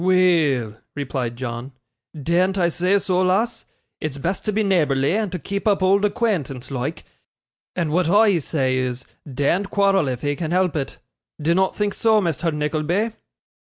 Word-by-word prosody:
'Weel,' 160 Hz, -, +2 dB
replied 130 Hz, -4 st, -3 dB
John, 120 Hz, +1 st, -6 dB, 0.5 s
'dean't 180 Hz, +6 st, +1 dB
I 175 Hz, -2 st, +3 dB
say 180 Hz, +4 st, +2 dB
so, 185 Hz, -2 st, 0 dB
lass? 215 Hz, +6 st, +1 dB, 0.3 s
It's 150 Hz, -3 st, -4 dB
best 175 Hz, +7 st, -2 dB
to 215 Hz, -, +1 dB
be 215 Hz, +1 st, +1 dB
neighbourly, 150 Hz, -8 st, +2 dB
and 190 Hz, -7 st, -2 dB
keep 200 Hz, +2 st, -3 dB
up 200 Hz, -2 st, +2 dB
old 195 Hz, +2 st, +4 dB
acquaintance 165 Hz, -, -1 dB
loike; 135 Hz, +4 st, -3 dB, 0.7 s
and 170 Hz, -4 st, -1 dB
what 170 Hz, +1 st, +2 dB
I 205 Hz, -2 st, +5 dB
say 130 Hz, -4 st, 0 dB
is, 125 Hz, 0 st, -2 dB, 0.3 s
dean't 155 Hz, +9 st, 0 dB
quarrel 195 Hz, -5 st, +2 dB
if 125 Hz, 0 st, -3 dB
'ee 145 Hz, 0 st, 0 dB
can 160 Hz, +1 st, -4 dB
help 180 Hz, -1 st, +1 dB
it. 140 Hz, -3 st, -3 dB, 0.4 s
Dinnot 170 Hz, +5 st, +1 dB
think 205 Hz, -1 st, 0 dB
so, 220 Hz, -2 st, +3 dB
Mr. 170 Hz, -2 st, -1 dB
Nickleby? 155 Hz, +8 st, -1 dB
170 Hz, 155 wpm, -22 LUFS, 140-195 Hz, 0.7 s, I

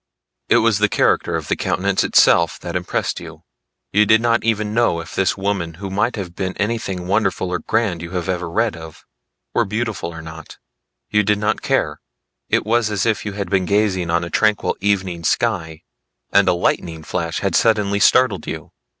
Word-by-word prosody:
It -, -, +5 dB
was 110 Hz, -3 st, +3 dB
the 105 Hz, 0 st, +3 dB
character -, -, +1 dB
of -, -, -4 dB
the -, -, +1 dB
countenance 95 Hz, 0 st, 0 dB
itself -, -, +4 dB
that -, -, -6 dB
impressed -, -, -2 dB
you. -, -, -11 dB, 0.5 s
You 105 Hz, +1 st, +4 dB
did 110 Hz, +2 st, +6 dB
not 115 Hz, 0 st, +1 dB
even 110 Hz, -2 st, 0 dB
know 115 Hz, -7 st, +2 dB
if 85 Hz, +1 st, -9 dB
this 95 Hz, +3 st, +1 dB
woman 95 Hz, -4 st, -2 dB
who 95 Hz, +2 st, -7 dB
might 105 Hz, +5 st, 0 dB
have 90 Hz, -5 st, -6 dB
been 95 Hz, -1 st, -3 dB
anything 105 Hz, -4 st, -2 dB
wonderful 100 Hz, -1 st, 0 dB
or 90 Hz, -, -1 dB
grand 100 Hz, -2 st, -1 dB
you 85 Hz, +1 st, -8 dB
ever 90 Hz, -1 st, -2 dB
read 110 Hz, +4 st, 0 dB
of, 80 Hz, -1 st, -11 dB, 0.5 s
were -, -, +3 dB
beautiful 105 Hz, -4 st, -3 dB
or 85 Hz, -1 st, -9 dB
not. 80 Hz, 0 st, -10 dB, 0.5 s
You 105 Hz, -, +4 dB
did 105 Hz, +1 st, +1 dB
not 105 Hz, +1 st, -1 dB
care; -, -, -1 dB, 0.5 s
it -, -, +1 dB
was 115 Hz, 0 st, +2 dB
as 105 Hz, -2 st, -1 dB
if 110 Hz, -2 st, 0 dB
you 100 Hz, -, -4 dB
had 100 Hz, -3 st, -5 dB
been 95 Hz, -1 st, +2 dB
gazing 100 Hz, -3 st, +1 dB
on 85 Hz, +1 st, +1 dB
a 85 Hz, -, -6 dB
tranquil 105 Hz, +2 st, +1 dB
evening 95 Hz, -4 st, 0 dB
sky 80 Hz, -8 st, -1 dB, 0.5 s
and 100 Hz, -1 st, +4 dB
a -, -, +4 dB
lightning 85 Hz, -2 st, -1 dB
flash 85 Hz, +1 st, -3 dB
had 100 Hz, -, -1 dB
suddenly 105 Hz, -3 st, +2 dB
startled 100 Hz, -4 st, +3 dB
you. -, -, -6 dB
100 Hz, 190 wpm, -20 LUFS, 85-105 Hz, 0.5 s, did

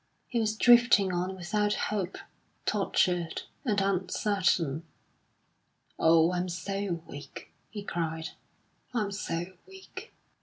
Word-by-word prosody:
He 235 Hz, -, -1 dB
was 215 Hz, -1 st, 0 dB
drifting 235 Hz, -6 st, +6 dB
on 180 Hz, +2 st, -1 dB
without 210 Hz, +3 st, 0 dB
hope, 195 Hz, -3 st, -2 dB, 0.5 s
tortured 175 Hz, -2 st, +1 dB, 0.2 s
and 210 Hz, -6 st, +1 dB
uncertain. 185 Hz, -5 st, +1 dB, 1.2 s
"Oh, 165 Hz, +1 st, +5 dB
I'm 180 Hz, 0 st, -1 dB
so 180 Hz, 0 st, -3 dB
weak," 145 Hz, +1 st, -10 dB, 0.2 s
he 205 Hz, -2 st, -6 dB
cried; 160 Hz, -3 st, -3 dB, 0.7 s
"I'm 210 Hz, -3 st, 0 dB
so 180 Hz, -2 st, -3 dB
weak!" 385 Hz, 0 st, -11 dB
190 Hz, 105 wpm, -29 LUFS, 170-210 Hz, 1.2 s, drifting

